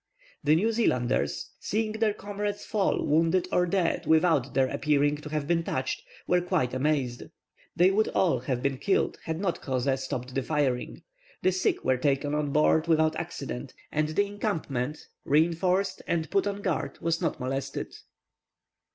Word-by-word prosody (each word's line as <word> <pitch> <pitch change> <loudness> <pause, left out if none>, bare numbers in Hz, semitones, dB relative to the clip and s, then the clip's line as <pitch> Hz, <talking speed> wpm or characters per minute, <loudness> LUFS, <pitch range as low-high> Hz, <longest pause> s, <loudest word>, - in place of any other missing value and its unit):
The 150 +1 +5
New 215 +8 +2
Zealanders, 125 - 0
seeing 215 +1 -1
their 220 -1 0
comrades 205 0 -4
fall 205 -3 0
wounded 165 +4 +2
or 180 0 +2
dead, 175 -1 0
without 160 -5 +3
their 135 - +4
appearing 145 +1 +1
to 150 0 -9
have 150 -1 -2
been 170 0 +2
touched, 130 -4 -2 0.2
were 180 0 +3
quite 175 -9 0
amazed. 130 -3 0 0.5
They 180 +2 +5
would 215 +3 +2
all 165 -9 +2
have 125 0 -3
been 135 -2 0
killed 195 - +1
had 160 0 -3
not 185 -4 -1
Crozet 130 0 0
stopped 130 -1 -4
the 135 - 0
firing. 135 -3 -1 0.4
The 185 - +4
sick 185 0 0
were 130 -1 +3
taken 140 +2 0
on 150 -1 0
board 155 +2 +3
without 160 -1 +3
accident, 60 0 -5 0.2
and 155 0 +1
the 160 +7 +1
encampment, 155 - -3 0.2
reinforced 170 +6 +2
and 165 -2 -1
put 200 0 +2
on 200 0 -3
guard, 180 -4 -2
was 165 +1 -1
not 165 -4 -1
molested. 135 +1 -4
155 Hz, 160 wpm, -28 LUFS, 135-185 Hz, 0.5 s, The